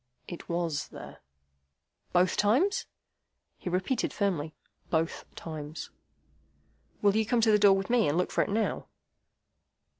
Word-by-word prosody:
"It 175 - -8
WAS 170 -3 -1
there." - - -11 0.9
"Both 180 +1 +3
times?" 270 - +2 0.7
He - - -4
repeated 185 +8 0
firmly: 170 -7 -1 0.3
"Both 160 0 -1
times." 155 -1 -7 1.1
"Will 200 0 +4
you 220 - +3
come 230 +2 +1
to 220 -1 +4
the 210 - +5
door 200 -1 +7
with 195 +4 -3
me, 245 -3 +4
and 145 +3 +1
look 180 - 0
for - - +2
it - - -5
now?" 215 +2 -1
195 Hz, 140 wpm, -29 LUFS, 165-220 Hz, 1.1 s, door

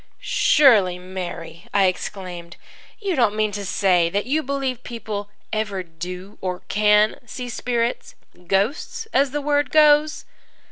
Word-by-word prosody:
"Surely, 275 - +4
Mary," 180 0 -7
I 200 -1 +5
exclaimed, 180 -2 -4 0.4
"you 395 -4 -2
don't 235 -6 +2
mean 215 -1 +1
to 205 0 -5
say 180 -3 +2
that 200 +4 -1
you 295 +5 +1
believe 270 -3 -3
people 215 -3 -6 0.2
ever 210 -3 -2
do 180 +3 -8
or 180 -1 -3
can 210 +1 +3
see 245 +2 -6
spirits 240 0 -2 0.3
ghosts, 205 - -1
as 275 +1 +3
the 295 +2 -3
word 290 -1 +1
goes?" 300 0 +4
210 Hz, 135 wpm, -22 LUFS, 185-270 Hz, 0.4 s, I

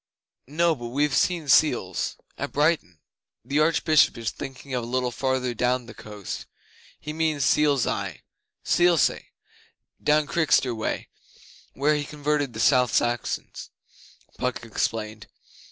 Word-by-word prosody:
'No 165 +4 +2
but 120 -3 -7
we've 145 +4 0
seen 170 -4 +1
seals 125 - +2 0.2
at - - -5
Brighton.' 150 - +1 0.5
'The 140 +4 0
Archbishop 155 -2 +3
is 115 -1 -3
thinking 135 0 -8
of 125 -2 -1
a - - -6
little 125 0 -1
farther 130 -1 -1
down 125 +1 0
the 120 - -11
coast. 105 -2 -8 0.5
He 150 - -6
means 155 -3 0
Seal's 145 -3 +3
Eye - - -3 0.4
Selsey 175 -2 +2 0.7
down 150 0 +2
Chichester 145 -6 +2
way 110 -1 -3 0.7
where 145 +3 +2
he 150 -1 -1
converted 145 -3 -2
the 110 - -7
South 125 +1 +4
Saxons,' 120 -2 -2 0.7
Puck 125 -2 -2
explained. 110 -1 -3
135 Hz, 130 wpm, -25 LUFS, 120-150 Hz, 0.7 s, South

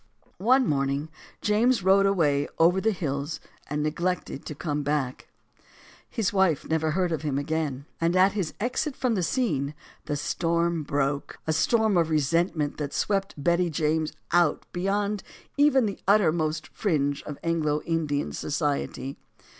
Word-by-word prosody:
One 255 +6 +4
morning 140 -1 0 0.3
James 220 +1 +3
rode 195 +1 +5
away 150 -7 +2
over 175 +3 +4
the 220 - +2
hills 145 -5 -3 0.3
and 150 +1 -1
neglected 170 -1 -2
to 150 - -5
come 150 -1 -2
back. 140 -3 -2 0.8
His 215 -6 -1
wife 190 -7 +2
never 160 0 0
again 155 - 0
heard 180 -2 +1
of 160 - -1
him. 145 -1 -2 0.2
And 170 +2 +2
at 190 +2 +5
his 190 -6 -3
exit 255 +5 -1
from 250 -3 0
the 195 - 0
scene, 155 - 0 0.3
the 150 - -2
storm 170 +2 0
broke; 140 -1 -1
a 160 - +1
storm 220 +4 +2
of 165 -2 +2
resentment 155 0 +1
that 145 -2 -4
swept 195 -1 0
Betty 170 +4 +2
James 155 0 0 0.2
out 175 -3 +3
beyond 200 +3 0 0.3
even 285 -4 +4
the 200 - -3
uttermost 160 -6 +2
fringe 145 -7 0
of 150 - -6
Anglo 155 -3 0
Indian 155 -3 -1
society. 145 -2 -2
165 Hz, 145 wpm, -26 LUFS, 150-195 Hz, 0.8 s, rode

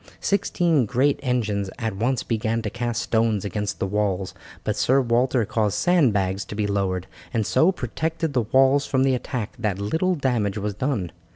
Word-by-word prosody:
Sixteen 170 - +1
great 130 +5 +2
engines 105 -7 -1
at 110 -4 -3
once 120 +5 0
began 115 0 -1
to 105 - -3
cast 120 0 -2
stones 110 -3 +1
against 105 0 -3
the - - -1
walls, 100 -1 -1 0.3
but 105 - -1
Sir 130 +6 +3
Walter 125 -1 +2
caused 105 -1 0
sandbags 105 - +2
to - - -7
be 105 0 0
lowered, 95 -3 -1 0.3
and 110 -2 +1
so 165 - +4
protected 160 +1 -3
the 125 - +2
walls 135 +5 +3
from 130 -1 +2
the 135 -1 +3
attack 120 -3 -3
that 105 -4 -1
little 160 - 0
damage 120 - 0
was 105 0 -2
done. 105 - -2
115 Hz, 175 wpm, -24 LUFS, 105-130 Hz, 0.3 s, so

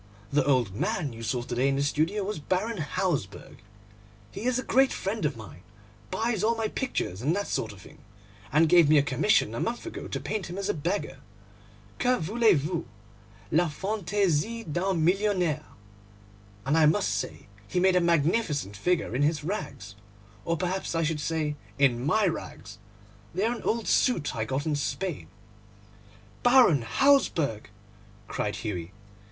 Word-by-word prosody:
'The 145 0 +4
old 125 -8 +2
man 140 - -2
you 115 - -9
saw 120 +1 -2
to 120 - -6
day 130 +3 +2
in 135 - +1
the 140 - 0
studio 160 +8 0
was 205 -2 -3
Baron 190 +7 -1
Hausberg. 150 - -3 0.7
He 215 - -7
is 255 -1 +2
a 255 - -2
great 265 +1 +3
friend 195 -2 -2
of 145 -5 -1
mine, 90 -7 -11 0.5
buys 225 - -1
all 230 +2 +3
my 225 -1 -1
pictures 160 - -3
and 150 +7 +1
that 200 0 -1
sort 110 - -2
of 100 -3 -13
thing, - - -15 0.5
and 160 +2 +4
gave 170 -2 +6
me 155 - +6
a 140 - +5
commission 135 - +2
a 115 - -3
month 240 +7 -3
ago 340 - -6
to - - -3
paint 215 -3 -3
him 180 - -6
as 200 - -2
a - - +2
beggar. 175 +6 -3 0.8
Que 250 0 +3
voulez 215 +3 +3
vous? 165 +2 -3 0.6
La 170 +1 +3
fantaisie 200 +3 -1
d'un 175 0 0
millionnaire! 180 -5 +1 1.0
And 140 +3 +2
I 155 - +6
must 150 -9 +2
say 105 - -4 0.2
he 180 - -1
made 185 0 +4
a 180 - +4
magnificent 160 - +1
figure 165 - 0
in 130 - 0
his 150 0 +1
rags, 145 - -5 0.5
or 170 0 0
perhaps 185 0 -2
I 165 - +1
should 155 -1 -1
say 150 0 -2 0.2
in 130 -4 +3
my 205 +9 +2
rags; 105 - -5 0.6
they 195 +4 +1
are 235 - +1
an - - -8
old 230 -1 -1
suit 165 - +2
I 110 -1 -1
got 135 +5 -2
in 155 -2 0
Spain.' 170 +3 -3 1.1
'Baron 245 - +6
Hausberg!' 155 - +2 0.6
cried 105 - -2
Hughie. 95 -5 -5
165 Hz, 170 wpm, -27 LUFS, 140-200 Hz, 1.1 s, gave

